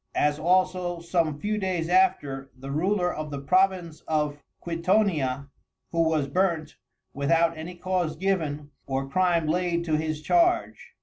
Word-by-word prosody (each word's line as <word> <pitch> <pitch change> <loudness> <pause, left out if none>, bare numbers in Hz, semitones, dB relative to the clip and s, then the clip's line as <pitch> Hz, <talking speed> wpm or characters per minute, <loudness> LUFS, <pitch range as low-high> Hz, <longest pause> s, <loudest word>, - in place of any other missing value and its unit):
As 150 0 +2
also 180 0 +1
some 170 -3 0
few 210 +3 -1
days 185 -4 -1
after, 170 -7 +2
the 135 +1 -7
Ruler 180 +4 +1
of 155 0 -5
the 145 - -5
Province 180 +1 +1
of 150 -2 -1 0.2
Quitonia, 165 -6 0 0.4
who 170 - +1
was 160 -3 +1
burnt, 160 -1 0 0.4
without 165 +4 +2
any 165 +3 -7
Cause 175 -3 -1
given, 155 -5 -2 0.2
or 135 0 -2
Crime 170 +2 +2
laid 170 +1 0
to 155 -2 +1
his 155 -1 -3
Charge. 345 - +1
165 Hz, 140 wpm, -26 LUFS, 150-185 Hz, 0.4 s, As